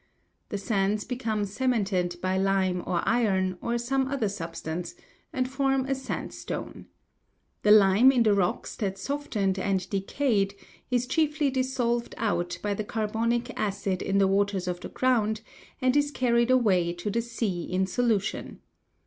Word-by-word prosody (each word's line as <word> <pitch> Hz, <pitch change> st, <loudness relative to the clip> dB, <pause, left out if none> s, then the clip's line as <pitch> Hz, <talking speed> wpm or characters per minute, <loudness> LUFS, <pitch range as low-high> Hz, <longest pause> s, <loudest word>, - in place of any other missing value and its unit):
The 205 Hz, -, -2 dB
sands 200 Hz, 0 st, 0 dB
become 225 Hz, -5 st, -2 dB
cemented 200 Hz, -5 st, 0 dB
by 185 Hz, 0 st, +1 dB
lime 190 Hz, -1 st, +1 dB
or 170 Hz, -, 0 dB
iron, 190 Hz, -6 st, +1 dB
or 235 Hz, 0 st, -1 dB
some 265 Hz, +3 st, 0 dB
other 265 Hz, -6 st, -1 dB
substance, 170 Hz, -2 st, -5 dB, 0.4 s
and 255 Hz, -1 st, -1 dB
form 270 Hz, 0 st, +1 dB
a 270 Hz, -, 0 dB
sandstone. 265 Hz, 0 st, -5 dB, 0.7 s
The 210 Hz, -, +2 dB
lime 210 Hz, +4 st, +7 dB
in 250 Hz, -3 st, +3 dB
the 215 Hz, -2 st, +4 dB
rocks 190 Hz, -3 st, 0 dB
that 195 Hz, -3 st, -2 dB
softened 205 Hz, -6 st, -1 dB
and 190 Hz, -1 st, 0 dB
decayed 200 Hz, 0 st, 0 dB, 0.3 s
is 245 Hz, -1 st, +1 dB
chiefly 300 Hz, +1 st, +1 dB
dissolved 255 Hz, -2 st, -1 dB
out 175 Hz, -6 st, -1 dB
by 205 Hz, -1 st, 0 dB
the 215 Hz, -, -3 dB
carbonic 230 Hz, +3 st, -1 dB
acid 195 Hz, -2 st, -1 dB
in 195 Hz, -, 0 dB
the 195 Hz, -1 st, +4 dB
waters 195 Hz, -1 st, +1 dB
of 175 Hz, -1 st, -2 dB
the -, -, -7 dB
ground, 220 Hz, -4 st, +1 dB, 0.4 s
and 255 Hz, +1 st, +2 dB
is 290 Hz, 0 st, +3 dB
carried 235 Hz, -4 st, +2 dB
away 190 Hz, -9 st, +3 dB
to 175 Hz, +4 st, -4 dB
the 230 Hz, -, +1 dB
sea 225 Hz, -6 st, -2 dB
in 185 Hz, +1 st, 0 dB
solution. 215 Hz, 0 st, -1 dB
210 Hz, 150 wpm, -27 LUFS, 195-250 Hz, 0.7 s, lime